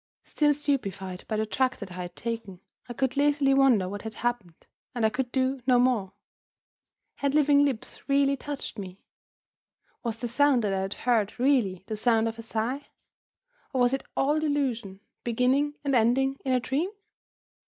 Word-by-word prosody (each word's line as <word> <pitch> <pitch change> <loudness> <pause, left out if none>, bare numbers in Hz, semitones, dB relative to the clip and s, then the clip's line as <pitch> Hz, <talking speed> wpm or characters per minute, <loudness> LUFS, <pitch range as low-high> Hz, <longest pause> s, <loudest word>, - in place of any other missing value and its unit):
Still 295 -1 +2
stupefied 195 -11 -3
by 220 - -2
the 220 - 0
drug 260 +4 0
that 200 -3 -8
I 180 0 -6
had 175 0 -7
taken, 225 -5 -5 0.3
I - - -4
could 260 +2 -1
lazily 285 -1 +3
wonder 260 -9 +4
what 205 +2 -5
had 220 -1 -7
happened, 240 -10 -3 0.3
and 235 -2 +1
I 220 - +3
could 250 0 -2
do 260 0 0
no 250 -1 +5
more. 240 -6 +2 1.0
Had 280 0 0
living 290 -1 +5
lips 275 0 -3
really 275 0 +3
touched 280 -5 -6
me? 190 -1 -9 1.0
Was 230 -2 -3
the 240 - -3
sound 265 0 +3
that 200 -2 0
I 190 - 0
had 195 +1 -3
heard 230 -3 +1
really 240 -9 +2
the 215 - -4
sound 225 0 +2
of 225 0 -5
a - - -4
sigh? 230 +5 -3 0.9
Or 260 - +1
was 245 +1 +3
it 270 - -1
all 295 +3 +2
delusion, 255 -10 -1 0.2
beginning 255 +5 +1
and 280 -1 0
ending 265 +3 +2
in 265 - -1
a 255 - +3
dream? 275 +8 -1
245 Hz, 175 wpm, -27 LUFS, 220-275 Hz, 1.0 s, no